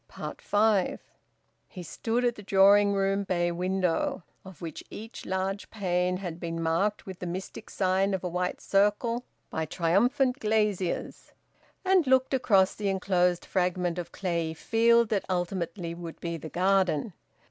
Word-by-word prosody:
FIVE. 205 Hz, -2 st, +2 dB, 0.7 s
He 180 Hz, -4 st, -9 dB
stood 230 Hz, +8 st, -1 dB
at 240 Hz, -, +2 dB
the 210 Hz, -, -11 dB
drawing 200 Hz, +1 st, +5 dB
room 195 Hz, 0 st, +1 dB
bay 175 Hz, -2 st, 0 dB
window 185 Hz, -, -1 dB, 0.2 s
(of 190 Hz, -3 st, -12 dB
which 165 Hz, -3 st, -7 dB
each 225 Hz, +2 st, -9 dB
large 190 Hz, +2 st, -2 dB
pane 180 Hz, -3 st, 0 dB
had 175 Hz, -3 st, -6 dB
been 165 Hz, -1 st, -4 dB
marked 165 Hz, +6 st, 0 dB
with 190 Hz, -2 st, -8 dB
the 180 Hz, -, -5 dB
mystic 185 Hz, +2 st, -6 dB
sign 190 Hz, +1 st, +1 dB
of 190 Hz, -, -6 dB
a -, -, -1 dB
white 180 Hz, +1 st, -2 dB
circle 210 Hz, +5 st, +1 dB, 0.3 s
by 160 Hz, 0 st, -2 dB
triumphant 245 Hz, -, +2 dB
glaziers), 210 Hz, -4 st, -1 dB, 0.5 s
and 370 Hz, -5 st, +4 dB
looked 260 Hz, +1 st, +3 dB
across 200 Hz, -7 st, +3 dB
the 205 Hz, -2 st, -2 dB
enclosed 180 Hz, -2 st, +1 dB
fragment 180 Hz, -1 st, 0 dB
of 170 Hz, -1 st, -6 dB
clayey 170 Hz, -4 st, -2 dB
field 235 Hz, +4 st, +3 dB
that 205 Hz, -3 st, 0 dB
ultimately 175 Hz, -1 st, -2 dB
would 170 Hz, -1 st, -8 dB
be 170 Hz, -1 st, -3 dB
the 160 Hz, -1 st, -7 dB
garden. 185 Hz, -1 st, +1 dB
190 Hz, 145 wpm, -28 LUFS, 175-210 Hz, 0.7 s, drawing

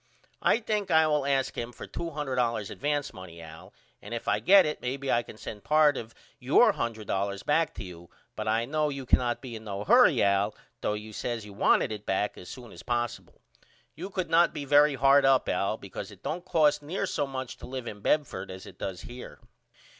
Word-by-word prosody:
I -, -, +3 dB
think 215 Hz, -3 st, -2 dB
I 160 Hz, 0 st, +5 dB
will 150 Hz, -2 st, +1 dB
ask 135 Hz, -2 st, 0 dB
him 120 Hz, +1 st, -4 dB
for -, -, -9 dB
$200 130 Hz, -9 st, -2 dB
advance 145 Hz, 0 st, -2 dB
money 90 Hz, -3 st, -11 dB
Al 80 Hz, -1 st, -12 dB, 0.3 s
and 105 Hz, +3 st, -6 dB
if 115 Hz, -, -6 dB
I -, -, +2 dB
get 195 Hz, +1 st, +6 dB
it 150 Hz, -, -3 dB
may 125 Hz, +2 st, -2 dB
be 140 Hz, -1 st, -3 dB
I 120 Hz, -, +3 dB
can 110 Hz, -, -12 dB
send 105 Hz, -2 st, -8 dB
part 150 Hz, +3 st, +4 dB
of 115 Hz, -1 st, -7 dB, 0.2 s
your -, -, +5 dB
$100 100 Hz, -4 st, -3 dB
back 160 Hz, +2 st, +1 dB
to -, -, -6 dB
you 85 Hz, -2 st, -11 dB, 0.3 s
but 110 Hz, 0 st, -4 dB
I 110 Hz, +2 st, +1 dB
know 150 Hz, +3 st, 0 dB
you 140 Hz, -2 st, -5 dB
cannot 120 Hz, 0 st, +1 dB
be 125 Hz, -3 st, -7 dB
in 110 Hz, -, -8 dB
no 100 Hz, -1 st, -4 dB
hurry -, -, +5 dB
Al 100 Hz, +1 st, +2 dB, 0.3 s
though -, -, 0 dB
you 105 Hz, +1 st, -8 dB
says 115 Hz, 0 st, -4 dB
you 105 Hz, -, -11 dB
wanted 100 Hz, -, +3 dB
it 105 Hz, -1 st, -7 dB
back 100 Hz, +2 st, 0 dB
as 90 Hz, -, -11 dB
soon 125 Hz, -3 st, -10 dB
as -, -, -11 dB
possible. 120 Hz, -1 st, -3 dB, 0.5 s
You 180 Hz, +5 st, -7 dB
could 185 Hz, -4 st, -3 dB
not 170 Hz, +1 st, +4 dB
be 145 Hz, -, -4 dB
very 145 Hz, +1 st, +5 dB
hard 135 Hz, +2 st, +5 dB
up 135 Hz, -1 st, +4 dB
Al 100 Hz, +3 st, 0 dB
because 100 Hz, -1 st, -8 dB
it 100 Hz, -3 st, -15 dB
don't 175 Hz, +3 st, -4 dB
cost 150 Hz, -2 st, +3 dB
near 175 Hz, +7 st, -3 dB
so 145 Hz, -6 st, -1 dB
much 130 Hz, -2 st, -6 dB
to -, -, -10 dB
live 130 Hz, -1 st, -5 dB
in 105 Hz, -3 st, -7 dB
Bedford 110 Hz, -8 st, 0 dB
as 95 Hz, 0 st, -9 dB
it -, -, -13 dB
does 95 Hz, -2 st, -5 dB
up -, -, -9 dB
here. 125 Hz, +1 st, -10 dB
125 Hz, 220 wpm, -28 LUFS, 105-150 Hz, 0.5 s, get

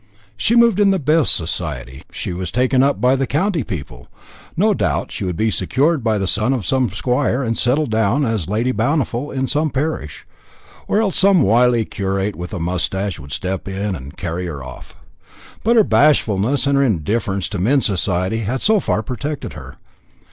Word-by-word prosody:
She 225 Hz, -, +1 dB
moved 235 Hz, -4 st, +4 dB
in 205 Hz, -1 st, +5 dB
the 195 Hz, -, +2 dB
best 155 Hz, -2 st, +3 dB
society, 75 Hz, -7 st, -3 dB
she -, -, -4 dB
was 90 Hz, -1 st, -4 dB
taken 130 Hz, +2 st, +2 dB
up 140 Hz, -6 st, +2 dB
by 125 Hz, +4 st, +3 dB
the 135 Hz, -1 st, -1 dB
county 165 Hz, +2 st, 0 dB
people. 70 Hz, -, -7 dB, 0.5 s
No -, -, +3 dB
doubt -, -, -1 dB
she -, -, -4 dB
would 90 Hz, -2 st, -2 dB
be 110 Hz, +3 st, +1 dB
secured 135 Hz, -, +1 dB
by 110 Hz, -2 st, +1 dB
the 100 Hz, -, -1 dB
son 110 Hz, +7 st, +1 dB
of 120 Hz, -8 st, -3 dB
some 130 Hz, +2 st, +1 dB
squire, 125 Hz, +5 st, 0 dB
and 115 Hz, -2 st, -1 dB
settle 135 Hz, +7 st, +1 dB
down 110 Hz, +4 st, +1 dB
as 110 Hz, -8 st, -2 dB
Lady 115 Hz, +5 st, 0 dB
Bountiful 130 Hz, +3 st, -1 dB
in 130 Hz, 0 st, -2 dB
some 155 Hz, +3 st, 0 dB
parish; 135 Hz, -, -4 dB, 0.6 s
or 210 Hz, -, +1 dB
else 200 Hz, -5 st, 0 dB
some 190 Hz, -5 st, +5 dB
wily 120 Hz, +1 st, +3 dB
curate 100 Hz, 0 st, -2 dB
with 90 Hz, +1 st, -7 dB
a 95 Hz, -, -4 dB
moustache 90 Hz, +2 st, -2 dB
would 70 Hz, 0 st, -11 dB
step 95 Hz, +4 st, -4 dB
in 100 Hz, +1 st, -3 dB
and 70 Hz, -2 st, -10 dB
carry 90 Hz, 0 st, -4 dB
her 70 Hz, -5 st, -6 dB
off. 65 Hz, -1 st, -11 dB, 0.7 s
But 235 Hz, +2 st, +3 dB
her 220 Hz, -, +6 dB
bashfulness 135 Hz, -, +2 dB
and 140 Hz, 0 st, +2 dB
her -, -, +4 dB
indifference 100 Hz, -, -1 dB
to 100 Hz, -2 st, -4 dB
men's 130 Hz, +9 st, +2 dB
society 95 Hz, +1 st, 0 dB
had 115 Hz, +4 st, -2 dB
so 215 Hz, 0 st, +3 dB
far 110 Hz, -, -1 dB
protected 140 Hz, +6 st, -5 dB
her. -, -, -10 dB
115 Hz, 190 wpm, -19 LUFS, 95-140 Hz, 0.7 s, her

